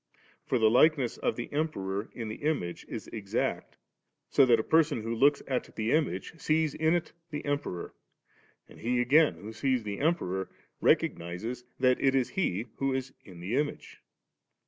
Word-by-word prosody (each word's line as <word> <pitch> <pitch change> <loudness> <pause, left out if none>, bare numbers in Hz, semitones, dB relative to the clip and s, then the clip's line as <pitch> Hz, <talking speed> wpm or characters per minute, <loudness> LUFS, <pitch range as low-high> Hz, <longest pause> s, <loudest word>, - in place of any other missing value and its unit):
For 130 - +2
the 110 -2 +4
likeness 135 -1 +4
of - - 0
the 120 - -6
Emperor 100 -10 -2
in 115 -2 -4
the 110 - -5
image 145 - -2
is - - -5
exacts; 100 -3 -3 0.5
so 135 - +6
that 115 -2 +5
a - - 0
person 155 -6 +2
who 115 +1 -2
looks 140 +5 +3
at 130 -2 -3
the 110 +1 -1
image, 155 +2 0
sees 155 -1 +1
in 160 +2 +2
it 175 - -2 0.2
the 150 -1 -5
Emperor; 145 -12 -3 0.7
and - - -15
he 120 +2 0
again 145 +6 +4
who 110 +2 -9
sees 125 +1 0
the 100 -1 -4
Emperor, 95 - 0 0.3
recognises 90 +9 0 0.2
that 130 -1 +3
it 135 -1 +3
is 130 -2 +2
he 115 - -1
who 135 -1 0
is 130 0 -4
in 90 -4 -12
the 95 +7 -2
image*. 145 +1 -3
125 Hz, 170 wpm, -29 LUFS, 110-145 Hz, 0.7 s, so